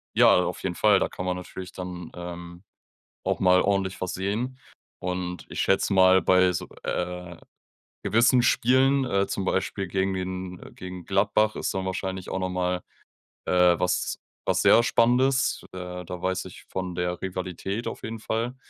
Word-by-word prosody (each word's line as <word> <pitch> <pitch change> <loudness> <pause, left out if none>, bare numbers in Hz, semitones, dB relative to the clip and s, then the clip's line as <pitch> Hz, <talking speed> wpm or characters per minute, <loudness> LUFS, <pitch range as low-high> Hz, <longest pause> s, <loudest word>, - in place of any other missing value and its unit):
Ja, - - +6
auf - - -4
jeden 90 -2 -2
Fall, 105 0 +4
da - - 0
kann 90 - -6
man 90 0 0
natürlich 90 +1 -8
dann, 90 -2 -7
ähm, 85 0 -8 0.6
auch - - 0
mal 90 0 +5
ordentlich 95 -1 0
was 95 - -2
sehen 110 +7 -2 0.4
und 90 -1 -4
ich - - -2
schätze 95 +1 +2
mal, 95 0 +6
bei 95 0 +5
so, - - -4 0.2
äh, 90 -1 -3 0.7
gewissen 120 +2 +4
Spielen, 130 +3 +3
äh, 100 -4 +1
zum 95 - -3
Beispiel 95 0 -1
gegen 95 +1 0
den 90 -1 -5
gegen 90 -1 -8
Gladbach 105 +2 +2
ist - - -2
dann 95 0 -2
wahrscheinlich 95 0 -4
auch - - -1
noch 95 0 -1
mal, 90 0 -1 0.6
äh, 90 -1 +4
was 90 - 0 0.3
was - - +1
sehr 115 - +7
Spannendes. 125 +3 +2
Äh, 90 -1 -6
da 90 +1 -7
weiß 95 0 -1
ich 95 - -11
von 95 -1 -4
der 90 0 -2
Rivalität 95 +3 -4
auf - - -5
jeden 115 0 -5
Fall. 115 +3 -2
95 Hz, 165 wpm, -26 LUFS, 90-100 Hz, 0.7 s, sehr